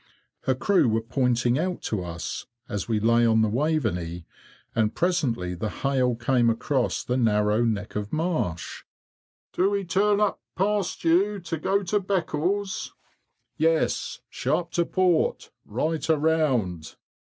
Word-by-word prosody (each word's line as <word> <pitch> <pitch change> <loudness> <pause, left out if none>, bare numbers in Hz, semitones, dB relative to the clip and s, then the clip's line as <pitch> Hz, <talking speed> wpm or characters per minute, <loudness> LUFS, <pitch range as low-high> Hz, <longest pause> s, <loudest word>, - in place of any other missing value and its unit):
Her 130 - +2
crew 185 - +3
were 110 +1 0
pointing 125 +1 +1
out 180 +2 -2
to 105 -5 -2
us, 85 -1 -5 0.2
as 105 -5 -4
we 110 -2 +1
lay 115 +2 +3
on 110 -1 +4
the - - +3
Waveney, 105 - -1 0.5
and 110 -2 +1
presently 125 - 0
the 100 +5 -3
hail 130 -2 0
came 120 0 +2
across 125 +3 0
the 125 - -1
narrow 105 -1 +2
neck 105 -3 -2
of 105 0 -3
marsh, 155 - -2 0.7
"Do 190 +2 +2
we 200 -1 -1
turn 200 +3 +2
up 210 -1 +1
past 200 0 0
you 195 +5 +3
to 170 -1 -3
go 195 +5 +1
to 210 +3 +1
Beccles?" 190 +1 -1 0.6
"Yes, 160 +1 +1
sharp 165 +6 -1
to 170 -1 0
port; 180 -4 +1 0.2
right 155 +9 -2
around!" 145 - +1
135 Hz, 140 wpm, -25 LUFS, 110-175 Hz, 0.7 s, on